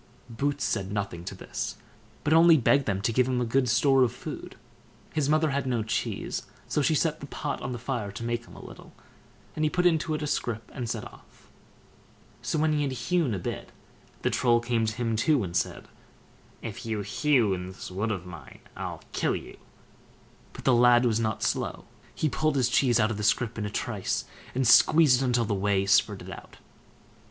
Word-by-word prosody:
Boots 140 0 -1
said 100 -1 -1
nothing 100 -5 -3
to - - -6
this, - - -5 0.5
but 150 - +2
only 165 0 +7
begged 140 +1 +3
them 95 -1 -1
to 115 - +1
give 125 +2 +3
him 130 -1 0
a 125 - 0
good 125 +2 +1
store 135 +3 +4
of 125 -2 +4
food. 125 - -8 0.6
His 150 -2 0
mother 155 0 +3
had 140 -1 -1
no 120 -3 0
cheese, 110 - -3 0.2
so 150 - 0
she 155 +3 +2
set 160 0 0
the 140 - -8
pot 145 0 -4
on 130 - -4
the 120 - -4
fire 120 -4 -3
to 115 - -6
make 120 0 -2
him - - -14
a - - -11
little, - - -12 0.6
and 155 - -1
he 155 - +3
put 180 +3 0
it - - +8
into 160 -1 -1
a 150 - -3
scrip 115 -6 -3
and 125 -4 -4
set - - -3
off. - - -17 0.9
So - - -2
when 155 0 +2
he 150 - +1
had 140 -2 -1
hewn 140 - 0
a - - -2
bit, 85 - -5 0.5
the - - +1
Troll 120 -2 +3
came 120 -1 0
to 110 - -2
him 115 -2 -1
too, 135 +2 +2
and 85 -2 -5
said: - - -2 0.8
"If - - -6
you 110 -2 -2
hew 120 0 +2
in 90 -1 -4
this 95 0 -9
wood 100 +5 -2
of 95 -5 -3
mine, 85 -4 -11
I'll - - -6
kill - - 0
you." - - -8 1.0
But - - -10
the 130 - +4
lad 120 0 +5
was 115 -2 +2
not 110 -2 -1
slow; - - -2 0.3
he 155 - 0
pulled 155 +1 0
his 125 -3 +2
cheese 120 -1 +3
out 110 0 +2
of 110 - -3
the 105 - -4
scrip 115 +1 +1
in 105 -2 -3
a - - -4
trice, - - -2 0.3
and 130 -1 +1
squeezed 145 +1 +6
it 130 -2 +1
till 120 -1 +2
the 105 - -1
whey 100 0 +1
spurted 100 0 +2
out. - - -11
120 Hz, 210 wpm, -27 LUFS, 110-140 Hz, 1.0 s, it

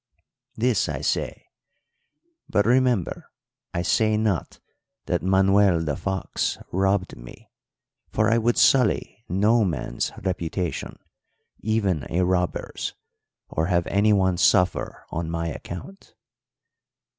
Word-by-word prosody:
This, - - +1
I - - -3
say; - - -2 1.0
but, 105 - +2
remember, 125 -5 +1 0.4
I 85 - -2
say 110 +3 +2
not 105 -6 -1 0.5
that - - 0
Manuel 95 -1 +4
the 75 -3 -1
Fox 95 +2 -2
robbed 95 0 0
me - - -14 0.6
for 110 - +1
I 115 +2 +3
would 115 +1 +1
sully 115 -4 +3
no 105 +6 +3
man's 80 -10 -2
reputation, 90 -1 -3 0.6
even 100 -8 0
a 90 +3 +1
robber's, 90 -1 -2 0.5
or 80 +1 -1
have 85 -2 +1
anyone 100 -3 +2
suffer 90 +1 +2
on 85 0 -3
my 85 0 -2
account. 90 - -9
95 Hz, 110 wpm, -24 LUFS, 85-110 Hz, 1.0 s, Manuel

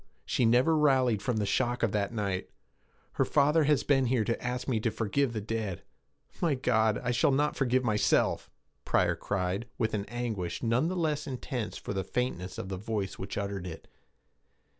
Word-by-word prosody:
She 120 - +1
never 125 +8 +4
rallied 130 -8 +3
from 125 -4 -1
the 105 - 0
shock 120 +4 0
of 115 - +2
that 100 0 0
night. 100 -5 -2 0.6
Her - - +1
father 150 +2 +3
has 150 -1 +3
been 135 -2 +3
here 120 -2 +2
to 115 +1 -2
ask 125 +1 -3
me 120 -5 +1
to 115 - 0
forgive 115 +5 0
the 110 -2 -3
dead. 105 -3 -3 0.6
My 165 -5 +2
God! 110 -4 +2
I 125 - 0
shall 120 +3 +3
not 145 +2 +1
forgive 130 -1 +1
myself!' 105 -3 +2 0.3
Pryor - - +2
cried, 100 +3 -2
with 110 -2 0
an 100 -2 -1
anguish 110 -7 -3
none 120 +6 +2
the 185 - -2
less 155 -3 -1
intense 125 -3 -4
for - - -5
the 95 -1 -1
faintness 95 -5 -3
of 115 -4 -5
the 95 - -3
voice 105 -1 -3
which 95 +1 -5
uttered 100 -2 -3
it. 80 - -9
115 Hz, 185 wpm, -29 LUFS, 100-130 Hz, 0.6 s, never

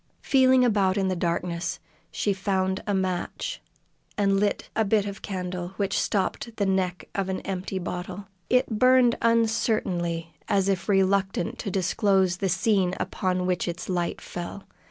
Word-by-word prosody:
Feeling 260 -2 +5
about 200 -4 +2
in 190 -1 +1
the 185 - 0
darkness, 170 0 -2 0.3
she 205 - 0
found 190 -1 -1
a 205 - +1
match 185 -2 -2 0.6
and 195 -1 +3
lit 205 0 0
a 220 - +3
bit 205 0 +2
of 200 -1 -6
candle 180 -2 -4
which 195 -1 0
stopped 215 +3 -1
the 200 - +1
neck 185 -2 -1
of 195 -1 -1
an 190 - -1
empty 190 0 -4
bottle. 185 +2 -5 0.2
It 250 -4 +2
burned 255 -2 +5
uncertainly 215 -7 +1
as 195 -1 +2
if 195 +1 -1
reluctant 195 +3 +1
to 210 - -3
disclose 190 -1 +2
the 195 0 -1
scene 185 0 +2
upon 185 -1 -1
which 180 -1 0
its 175 +2 -5
light 175 -2 -1
fell. 175 +3 -7
190 Hz, 155 wpm, -26 LUFS, 180-205 Hz, 0.6 s, Feeling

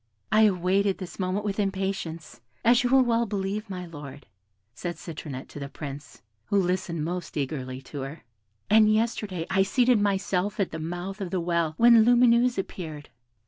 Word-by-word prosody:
"I 215 +1 +6
awaited 190 +1 +1
this 185 0 -8
moment 190 +3 -1
with 200 0 -2
impatience, 190 -5 -3 0.2
as 240 +1 +5
you 245 - +1
will 265 0 +6
well 235 -1 +1
believe, 200 +1 -3
my 180 -2 -5
Lord," 145 -4 -10 0.5
said 175 +7 -5
Citronette 145 -5 -7
to - - -9
the 140 0 -6
Prince, 145 0 -9 0.2
who 200 - 0
listened 180 -3 -1
most 175 -1 -4
eagerly 130 -2 -4
to 140 +1 -7
her; 140 +4 -7 0.4
"and 215 0 +5
yesterday 215 -6 -1
I 195 - +3
seated 240 +3 +3
myself 195 0 0
at 195 - 0
the 160 - -5
mouth 175 +5 -5
of 190 - -3
the 185 - -1
well, 170 -2 0
when 235 -1 +7
Lumineuse 240 +1 +4
appeared. 160 -6 -6
190 Hz, 170 wpm, -26 LUFS, 165-210 Hz, 0.5 s, when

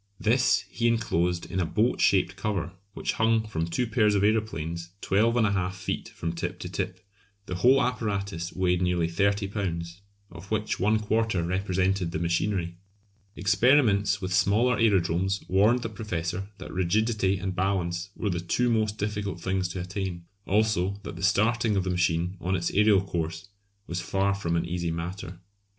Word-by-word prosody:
This 110 -2 +3
he 120 +4 0
enclosed 90 -7 0
in 95 - -3
a - - +2
boat 115 +7 +1
shaped 95 -1 +3
cover 100 -4 -2 0.2
which - - -2
hung 110 0 +3
from 80 -6 -2
two 105 +9 -1
pairs 110 -2 +2
of 100 - +2
aeroplanes 85 -6 -1
12 110 +4 +2
1/2 100 -5 +1
feet 95 0 -4
from 85 0 -4
tip 85 - -4
to - - -4
tip. - - -4 0.4
The 90 - -5
whole 130 +8 +5
apparatus 100 -8 -2
weighed 90 -1 +1
nearly 90 -2 +1
30 100 +3 +1
lbs., 85 -4 -4 0.3
of 85 +3 -11
which 110 -1 -1
one 105 +3 +3
quarter 110 -3 0
represented 95 0 0
the 85 - -3
machinery. 85 +1 -1 0.6
Experiments 100 +2 +3
with 95 0 -2
smaller 105 +6 +3
aerodromes 95 -3 +2
warned 110 +6 +3
the - - -1
Professor 95 -3 -4
that 95 - -9
rigidity 100 +2 +1
and 95 0 -4
balance 90 -1 -1
were 105 - -2
the 85 - -1
two 120 +8 0
most 110 -2 +1
difficult 105 -3 -3
things 95 +1 -1
to 90 +1 -5
attain; 90 -2 -4 0.2
also 100 -2 +1
that - - -7
the - - -8
starting 110 +3 +2
of 95 - +1
the 90 - -1
machine 90 +1 0
on 95 +2 0
its 85 -2 -1
aerial 105 -1 +4
course 85 0 -4 0.4
was 85 +1 -3
far 100 +3 0
from 85 -4 -2
an 85 0 0
easy 85 0 -2
matter. 85 +2 -5
95 Hz, 170 wpm, -27 LUFS, 90-105 Hz, 0.6 s, whole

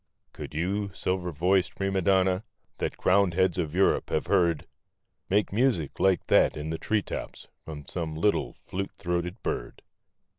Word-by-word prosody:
Could - - -8
you, 100 +5 -1
silver 90 -1 -1
voiced 90 +2 +1
Prima 95 -1 0
Donna, 95 +1 +3 0.3
that - - -3
crowned 95 -2 +3
heads 95 -1 +2
of 80 -1 -2
Europe 95 - +2
have 80 - 0
heard. 85 -5 +2 0.6
Make 100 +1 +2
music 110 - +1
like 95 -2 +3
that - - +4
in 75 +1 -4
the 80 - -3
tree 105 -2 0
tops - - -6 0.2
from 75 -2 -8
some 80 +1 -4
little, 100 +6 +1
flute 95 +1 -6
throated 90 +2 -3
bird? - - -4
90 Hz, 155 wpm, -27 LUFS, 85-95 Hz, 0.6 s, that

